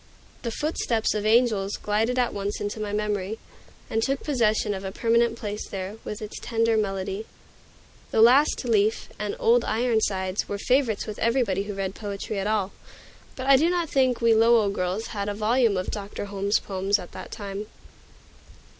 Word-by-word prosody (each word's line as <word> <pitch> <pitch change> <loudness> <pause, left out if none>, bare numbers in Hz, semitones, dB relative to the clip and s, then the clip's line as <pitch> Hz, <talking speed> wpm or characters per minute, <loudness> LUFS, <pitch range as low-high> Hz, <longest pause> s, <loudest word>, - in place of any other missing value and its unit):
The 235 - -3
"Footsteps 235 -4 -1
of 210 0 -1
Angels" 215 -4 +3
glided 220 +4 0
at 245 -1 +1
once 200 0 -3
into 205 +1 -4
my 210 -1 -3
memory, 210 0 -2 0.5
and 225 - -1
took 270 +3 -1
possession 220 -6 +1
of 190 0 -5
a 190 - -4
permanent 230 +2 +2
place 210 -1 -5
there, 195 +2 -5
with 210 +1 -6
its 210 - -7
tender 230 -1 +1
melody. 195 0 -2 0.8
"The - - 0
Last 265 +3 +5
Leaf" 220 -2 +1
and 210 0 -2
"Old 235 +1 +4
Ironsides" 215 -4 0
were 205 - -2
favorites 250 0 +1
with 215 -2 -7
everybody 230 -5 +1
who 205 -1 -5
read 195 -1 -3
poetry 200 0 -5
at 195 - -2
all, 210 -3 0 0.6
but 260 - -5
I 275 0 +7
do 320 +5 +3
not 350 -3 0
think 260 -3 +2
we 230 -1 +5
Lowell 225 -2 +4
girls 190 +3 -2
had 200 -1 -2
a 205 - -3
volume 220 0 +2
of 185 - -2
Dr. 205 -1 -5
Holmes's 200 0 0
poems 195 +1 0
at 180 -3 -10
that - - -9
time. 205 -1 -6
215 Hz, 175 wpm, -25 LUFS, 200-235 Hz, 0.8 s, I